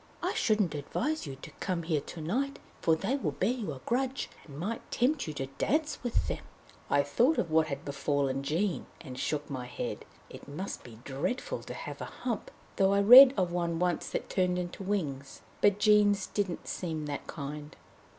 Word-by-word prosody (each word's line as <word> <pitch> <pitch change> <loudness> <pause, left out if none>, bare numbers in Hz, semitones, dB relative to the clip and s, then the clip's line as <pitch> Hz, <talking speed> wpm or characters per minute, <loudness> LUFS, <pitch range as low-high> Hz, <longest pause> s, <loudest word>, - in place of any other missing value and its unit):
I - - 0
shouldn't 210 -7 +2
advise 235 - -2
you 135 - -5
to - - -8
come 180 -3 -1
here 160 -3 0
to 165 - -8
night, 260 - -1 0.2
for 160 - +4
they 210 - -1
will 275 - -2
bear 195 +5 +1
you 230 -9 -3
a 130 -3 -8
grudge, 260 +2 -1 0.2
and 140 -2 -10
might 210 +8 -3
tempt 265 - +1
you 155 - -3
to 135 - -2
dance 305 0 +1
with 245 -2 0
them!" - - -3 0.5
I 140 0 +4
thought 245 - +3
of 165 - 0
what 160 0 +4
had 140 -1 -5
befallen 140 -1 0
Jean, 170 +7 -1
and 130 -1 -8
shook 150 -1 -1
my 130 -3 -5
head. 125 - -5 0.2
It - - -12
must 155 +8 -5
be 115 -3 -12
dreadful 140 - -2
to - - -8
have - - -7
a - - -3
hump, 235 -5 -4 0.3
though 195 0 +4
I 200 - +4
read 255 +6 +11
of 180 -2 +1
one 170 -1 -1
once 175 -1 0
that - - -3
turned 180 -1 +1
into 180 +1 -4
wings. 150 -9 -3 0.2
But 205 -1 +5
Jean's 205 -1 +4
didn't 195 -4 -3
seem 160 -4 -3
that 145 -1 -5
kind. 150 0 -6
175 Hz, 195 wpm, -30 LUFS, 145-215 Hz, 0.5 s, read